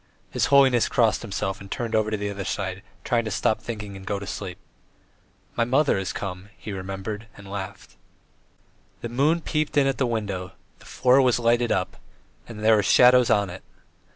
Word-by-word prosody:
His - - +1
holiness 135 -4 +5
crossed 115 -3 +2
himself 95 -2 -3
and 100 - -10
turned 115 +1 -4
over 110 0 +1
on 110 - -1
the 105 0 -2
other 100 -1 -5
side, 95 -1 -3 0.2
trying 120 -1 +1
to - - -2
stop 110 +1 0
thinking 105 -4 -6
and 95 - -10
go 100 +1 -2
to 100 - -7
sleep. 95 -2 -6 1.0
"My 120 - +2
mother 135 +5 +2
has 95 -3 -3
come," 95 0 -6
he 105 - -8
remembered 95 +3 -5
and 100 -1 -12
laughed. 95 -10 -7 1.0
The 120 - -4
moon 145 +8 +2
peeped 155 -2 -2
in 140 - +5
at 135 -1 0
the 130 - +2
window, 100 -5 -3 0.3
the - - -18
floor 130 +1 +3
was 125 -2 +3
lighted 120 0 +2
up, 90 -1 -1 0.5
and 110 -2 -8
there 110 0 +6
were - - +3
shadows 125 +4 +5
on 100 -3 +2
it. 95 - -9
105 Hz, 190 wpm, -24 LUFS, 95-120 Hz, 1.0 s, there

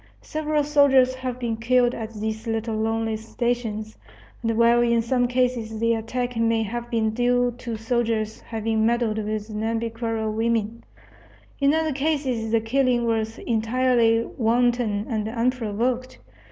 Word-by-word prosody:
Several 305 -1 -1
soldiers 280 -3 +4
have 255 -1 -4
been 235 -3 -2
killed 245 +1 +2
at 225 -1 -5
these 220 +2 -4
little 225 0 -2
lonely 225 0 -1
stations; 220 -1 -3 0.4
and 225 -1 -1
while 235 +1 +5
in 235 -1 +3
some 245 +1 +1
cases 245 -3 -1
the 230 +1 +2
attack 245 +2 -3
may 230 0 +2
have 240 +3 -5
been 225 -2 +1
due 245 +1 +1
to 235 -2 -5
the - - -3
soldiers 225 -2 -1
having 220 -1 -1
meddled 230 -1 +1
with 215 0 -3
Nhambiquara 225 0 -2
women, 225 0 -1 0.8
in 280 +2 +3
other 320 -2 0
cases 270 -6 -1
the 225 0 +2
killing 245 +1 +1
was 225 -1 -1
entirely 230 0 +2
wanton 235 -3 +1
and 215 -2 -2
unprovoked. 245 +1 -1
230 Hz, 140 wpm, -24 LUFS, 220-245 Hz, 0.8 s, while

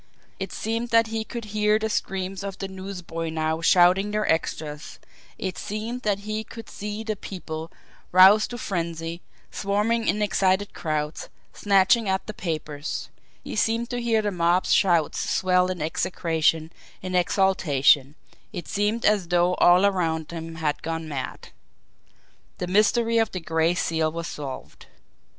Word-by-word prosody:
It - - -4
seemed 230 +2 -3
that 230 0 +5
he 220 -1 -1
could 235 0 -7
hear 210 0 +3
the 220 0 -1
screams 195 -2 -3
of 195 -1 -5
the 195 - -4
newsboys 180 -4 -6
now 160 0 -1
shouting 180 +3 +5
their 210 0 -1
extras; 155 -1 -2 0.4
it 185 -1 -4
seemed 225 +4 -4
that 205 -3 0
he 215 +1 -3
could 225 +1 -11
see 210 +2 -5
the 220 -1 -2
people, 165 -5 -7 0.4
roused 190 +4 +7
to 240 - -6
frenzy, 170 -4 -4 0.3
swarming 210 +3 0
in 210 +1 +1
excited 195 -1 +1
crowds, 155 -1 -3 0.2
snatching 200 +2 +3
at 190 0 0
the 215 - -6
papers; 155 -5 -4 0.3
he - - -6
seemed 230 +3 0
to 245 0 -2
hear 225 -2 +1
the 205 - 0
mob's 175 0 +2
shouts 170 -6 +3
swell 180 0 +2
in 180 -4 -3
execration, 160 -1 0 0.3
in 185 0 -4
exultation 155 -7 +3 0.4
it 180 -5 -7
seemed 210 +2 0
as 205 -4 +3
though 175 +1 +2
all 180 +3 +6
around 165 -5 0
him 165 -1 -6
had 155 -2 -2
gone 165 0 -4
mad. 140 -4 -6 1.1
The 180 - -3
mystery 225 +5 +3
of 225 -2 +1
the 185 - -2
Gray 165 +1 +1
Seal 160 -2 0
was 170 +1 -5
solved! 140 -5 -8
185 Hz, 150 wpm, -25 LUFS, 165-210 Hz, 1.1 s, roused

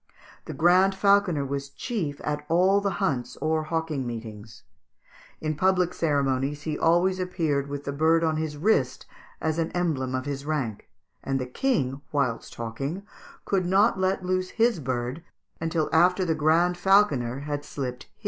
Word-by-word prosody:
The - - -6
Grand 185 +3 +4
Falconer 200 -7 +3
was 140 0 -4
chief 155 - -4
at 150 0 -2
all 185 +4 +4
the 200 - 0
hunts 125 -5 -1
or 155 0 0
hawking 155 -5 -2
meetings; 110 -2 -8 0.8
in 155 0 -2
public 180 +1 +2
ceremonies 140 -2 0
he 155 -1 -2
always 175 +4 +2
appeared 160 -6 -1
with 145 0 -5
the 140 - -3
bird 160 +3 +3
on 160 -1 +1
his 155 -2 -3
wrist, 145 -8 +1 0.3
as 160 +1 -1
an 165 - -1
emblem 145 -8 -1
of 130 +1 -3
his 140 -1 -4
rank; 140 -8 -3 0.3
and 135 0 -1
the 130 - -2
King, 135 - -1
whilst 130 -6 -1
hawking, 135 - -4 0.4
could 185 -3 0
not 195 +2 +3
let 190 0 0
loose 185 0 0
his 230 -4 +2
bird 130 +2 -3 0.4
until 165 -1 0
after 180 +3 +4
the 165 - +1
Grand 165 +3 +2
Falconer 145 - +3
had 145 0 -4
slipped 125 -4 -5
his. - - -35
155 Hz, 160 wpm, -26 LUFS, 140-180 Hz, 0.8 s, Grand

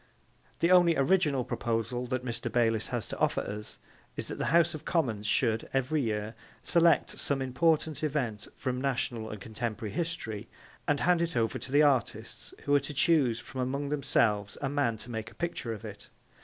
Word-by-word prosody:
The 170 - +4
only 175 -3 +6
original 145 -2 +3
proposal 120 +2 -2
that 130 0 -2
Mr. 120 -1 -3
Bayliss 115 -2 +2
has 120 -4 -3
to - - -6
offer - - +2
us 105 +1 -6 0.4
is - - -3
that - - -5
the - - 0
House 170 +2 +4
of 155 -1 -7
Commons 115 -13 0
should, 110 0 +1
every 135 +3 +1
year, 110 -2 -2 0.3
select 170 -1 +4
some 140 -1 0
important 155 +4 +1
event 125 -9 -1
from 130 -1 -2
national 125 -4 -1
and 105 - -6
contemporary 110 0 -4
history 115 -11 -3 0.4
and 145 -1 +2
hand 175 -1 +3
it 170 -6 -1
over 115 -1 0
to 130 - -8
the 145 +2 +5
artists 115 -5 0
who 145 - +1
are 145 - +6
to 140 +1 -7
choose 135 -7 +3
from 130 - -6
among 140 +3 -2
themselves 105 -8 +1
a 135 - -1
man 140 -5 +1
to 120 - -7
make 110 -1 -4
a - - -18
picture 170 -8 -3
of 110 -3 -6
it. - - -9
130 Hz, 185 wpm, -30 LUFS, 115-150 Hz, 0.4 s, only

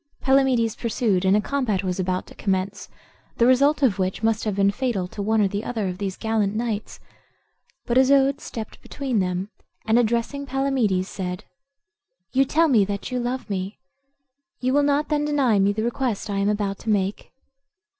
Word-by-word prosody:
Palamedes 265 -4 +2
pursued, 220 -5 0
and 190 +2 +4
a - - +2
combat 225 -8 -1
was 185 0 -2
about 185 0 -1
to - - -14
commence, 195 0 -2 0.5
the 235 - +4
result 280 +4 +4
of 210 -7 +3
which 185 +3 -2
must 225 0 +1
have 210 -3 -1
been 200 0 +3
fatal 210 -5 -2
to 200 - -7
one 220 +2 +1
or 200 - +2
other 225 -5 -2
of 180 0 -5
these 195 -2 -3
gallant 220 -2 0
knights; 220 -2 -3 0.9
but 245 +2 +3
Isoude 275 +2 +4
stepped 220 -2 -7
between 265 -6 -2
them, 185 +1 -2 0.4
and, 225 +2 +4
addressing 240 +5 -1
Palamedes, 255 -9 0
said, 180 -2 -5 0.9
"You 270 +1 +3
tell 325 +5 +3
me 235 -8 +4
that 200 +4 -5
you 250 - -1
love 245 +1 -3
me; 195 0 -4 0.8
you 255 +1 0
will 290 - +4
not 290 +1 +1
then 295 -1 +1
deny 275 -8 +2
me 195 +1 +3
the 215 +2 -2
request 235 -3 -2
I 200 - -1
am 200 +1 +1
about 205 -2 -1
to - - -6
make?" 200 -1 -1
220 Hz, 180 wpm, -23 LUFS, 195-260 Hz, 0.9 s, and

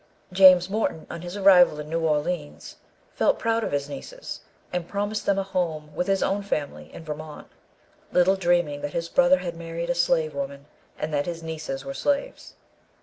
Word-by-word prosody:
James 185 -1 +7
Morton, 195 -5 -2
on 170 - -6
his 175 +3 -6
arrival 180 -6 +6
in 150 - -6
New 165 +2 -1
Orleans, 155 0 -2 0.4
felt - - +2
proud 230 -1 0
of - - -2
his 140 0 -1
nieces, - - -8 0.3
and 175 -1 -2
promised 205 +1 -2
them 200 - +3
a 195 - +1
home 165 -6 -3
with 180 - -2
his 195 -1 +2
own 200 +1 0
family 140 - -4
in - - -10
Vermont; 155 0 -8 0.6
little 180 +2 +4
dreaming 175 -5 +1
that 145 - -4
his 170 0 -3
brother 270 +5 +5
had 175 -8 -5
married 170 +1 -4
a - - +2
slave 170 -2 +1
woman, 140 0 -5 0.3
and 155 0 -4
that 145 +2 0
his 165 -1 -5
nieces 155 -4 -5
were 135 - -5
slaves. 290 - -2
170 Hz, 185 wpm, -25 LUFS, 150-195 Hz, 0.6 s, James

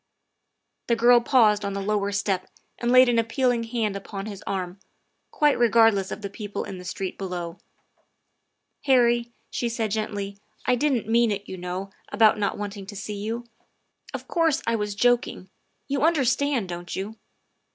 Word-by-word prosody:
The 235 - +3
girl 240 +1 +6
paused 220 -5 +4
on 200 0 -2
the 200 - -3
lower 200 0 0
step 195 -2 -1 0.3
and 240 - -1
laid 255 0 +8
an 235 -1 +3
appeal 245 +3 +1
ing 235 -1 -1
hand 225 -3 -1
upon 195 0 -6
his 205 -2 -8
arm, 185 -1 -3 0.5
quite 295 -3 +2
regardless 225 -4 +4
of 210 - -6
the 200 - -3
people 205 0 -5
in 185 - -7
the - - -9
street 185 +1 -4
below. 180 -2 -5 0.6
" - - -51
Harry," 240 -2 +4 0.2
she 240 - -1
said 225 -2 -2
gently, 205 -2 -3
" 215 - -33
I 250 - +3
didn't 250 -3 +1
mean 230 +1 +3
it, 205 -1 -3
you - - -6
know, 185 +2 -5 0.2
about 215 -1 +4
not 200 - 0
wanting 205 -1 -6
to 205 - -8
see 210 +1 -5
you. 225 +4 -4 0.7
Of - - -7
course, 330 -4 +1
I 230 - +1
was 210 -2 -2
joking. 240 -5 +1 0.4
You 275 -1 -1
understand, 280 - +2
don't 175 0 -5
you?" 205 +4 -5
215 Hz, 175 wpm, -25 LUFS, 200-240 Hz, 0.7 s, laid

